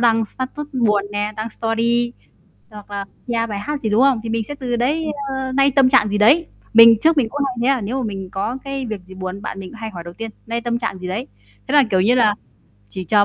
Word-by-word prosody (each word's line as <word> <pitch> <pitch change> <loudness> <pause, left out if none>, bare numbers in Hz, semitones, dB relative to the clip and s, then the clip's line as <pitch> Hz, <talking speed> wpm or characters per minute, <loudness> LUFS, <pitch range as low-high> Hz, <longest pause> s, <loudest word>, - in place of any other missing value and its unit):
đăng 225 -2 +3
status 265 +6 -6
buồn 210 -5 +2
nè, 205 +1 -1
đăng 220 +1 -4
story, 235 +2 0 0.6
hoặc 210 -1 -12
là 200 -1 -4 0.2
nghe 230 -1 0
bài 205 -2 -4
hát 290 +7 -4
gì, 220 - -1
đúng 215 +3 +3
không? 270 -3 +4
Thì 230 - -4
mình 225 0 0
sẽ 290 - -5
từ 255 -4 -2
đấy, 285 +7 0 0.2
ờ, 265 -1 -3
nay 275 +1 +3
tâm 265 -1 +5
trạng 265 -6 +5
gì 205 0 -1
đấy. 285 +11 +5 0.3
Mình 230 0 +9
trước 320 -1 +4
mình 240 -5 +3
cũng 290 +4 -3
hay 255 - -4
thấy, 245 - +1
à, - - -5
nếu 230 +6 -2
mà - - -2
mình 195 -3 -5
có 220 +6 -2
cái 275 -1 -4
việc 215 -4 -5
gì 190 - -12
buồn, 185 +1 -6
bạn 195 - -5
mình 185 - -7
cũng 230 - -12
hay 225 -1 -4
hỏi 175 -5 -8
đầu 170 0 -9
tiên: 225 +1 -6 0.2
"Nay 230 +1 -2
tâm 235 0 -1
trạng 215 - -3
gì 180 - -6
đấy?" 210 +8 -3 0.4
Thế 275 - -3
là, 290 - +7
kiểu 185 - +3
như 230 +6 +3
là, 215 -4 +4 0.6
chỉ 185 - -6
chờ 205 +4 +4
230 Hz, 265 wpm, -20 LUFS, 205-260 Hz, 0.6 s, Mình